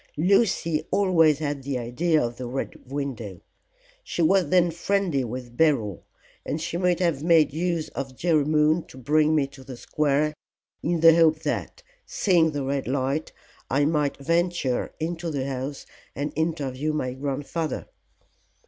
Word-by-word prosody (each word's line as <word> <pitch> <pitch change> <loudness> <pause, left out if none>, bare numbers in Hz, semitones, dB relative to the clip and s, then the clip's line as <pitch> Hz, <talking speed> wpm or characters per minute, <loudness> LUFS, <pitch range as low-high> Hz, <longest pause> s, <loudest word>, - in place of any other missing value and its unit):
"Lucy 170 -3 +2
always 175 -7 +4
had 145 -2 -3
the 135 -1 -3
idea 155 +8 +1
of 120 -3 -2
the 125 - -5
Red 130 0 -6
Window. 120 -10 -4 0.6
She 175 - -2
was 180 -1 +3
then 175 -1 +4
friendly 175 -4 0
with 120 0 -7
Beryl, 120 - +1 0.4
and 155 - -3
she 165 +1 -4
might 180 0 +1
have 170 -6 +1
made 160 -4 +4
use 170 0 -1
of 135 -1 -6
Jerry 160 0 +2
Moon 155 +2 +3
to - - -14
bring 150 +4 +2
me 145 -3 +3
to 135 -1 -14
the 130 -1 -9
square 150 +3 0 0.5
in 170 0 -1
the 165 -1 +8
hope 160 -2 +4
that, - - -3 0.2
seeing 185 - +2
the 145 -2 -3
red 135 0 -2
light, 135 +3 -1 0.4
I 145 +1 +2
might 150 -2 0
venture 165 -3 0
into 165 +1 -3
the 140 -4 -2
house 135 +1 -5 0.3
and 145 +2 -3
interview 155 -2 -1
my 130 -4 -2
grandfather." 145 +3 -3
150 Hz, 155 wpm, -25 LUFS, 135-165 Hz, 0.6 s, the